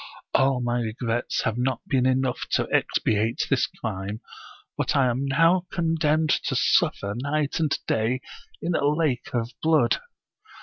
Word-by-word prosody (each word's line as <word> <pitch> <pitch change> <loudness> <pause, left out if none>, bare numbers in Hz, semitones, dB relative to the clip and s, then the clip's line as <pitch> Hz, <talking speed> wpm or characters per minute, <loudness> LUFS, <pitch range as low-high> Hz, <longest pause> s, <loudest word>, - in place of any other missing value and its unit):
All 135 -1 +3
my 120 0 0
regrets 115 +1 -2
have 110 +2 -1
not 130 +1 -1
been 130 -1 +2
enough 130 -1 0
to - - +2
expiate 110 +2 +1
this - - +3
crime, 95 +3 -5 0.6
and - - -1
I 135 -2 +4
am 130 +3 0
now 165 +6 +3
condemned 160 -3 +1
to - - -1
suffer 100 0 +2
night 145 +4 -1
and 155 -3 +1
day 115 +4 0 0.4
in 175 - 0
a 155 - 0
lake 150 -5 0
of 115 0 -1
blood. 155 -7 +3
130 Hz, 145 wpm, -25 LUFS, 120-155 Hz, 0.6 s, I